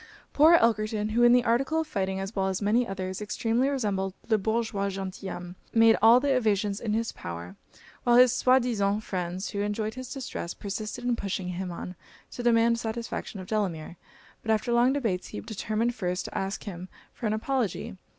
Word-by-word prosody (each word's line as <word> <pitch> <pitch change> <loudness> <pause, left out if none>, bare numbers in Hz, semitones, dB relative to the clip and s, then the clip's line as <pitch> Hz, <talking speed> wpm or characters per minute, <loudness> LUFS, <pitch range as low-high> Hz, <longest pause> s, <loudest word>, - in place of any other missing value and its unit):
Poor 315 +4 +7
Elkerton, 215 -5 +2
who 230 +2 +1
in 240 0 +7
the 245 0 +5
article 270 +7 +1
of - - -4
fighting, 190 -9 -2
as 195 +3 -5
well 190 -1 +1
as 190 -1 -1
many 225 +4 +2
others, 190 0 -4
extremely 230 +5 0
resembled 200 -8 -1
'le 220 -2 +3
Bourgeois 220 -1 -1
Gentilhomme,' 185 -2 -6 0.2
made 225 0 +7
all 230 +3 +8
the 275 0 +1
evasions 210 -4 +1
in 215 -3 -2
his 230 +1 0
power; 85 +2 -7 0.5
while 240 -1 +4
his 250 0 +7
soi 255 0 +4
disant 215 -4 0
friends, 185 0 -3
who 200 - -2
enjoyed 210 +1 -2
his 255 +1 -8
distress, 255 -10 -5
persisted 215 +4 -5
in 245 -1 +1
pushing 195 -4 -3
him 180 +1 -4
on 180 +1 -7 0.4
to - - -6
demand 230 -1 +3
satisfaction 225 -2 -4
of 185 - -7
Delamere; 180 -6 -2 0.4
but 220 - -8
after 220 +2 +1
long 240 +2 +4
debates, 225 -10 -1
he - - -6
determined 220 +2 -2
first 180 -5 -2
to - - -8
ask 195 +1 -3
him 185 -2 -7 0.2
for 230 - -3
an 210 - 0
apology. 225 -4 -2
215 Hz, 190 wpm, -27 LUFS, 195-240 Hz, 0.5 s, all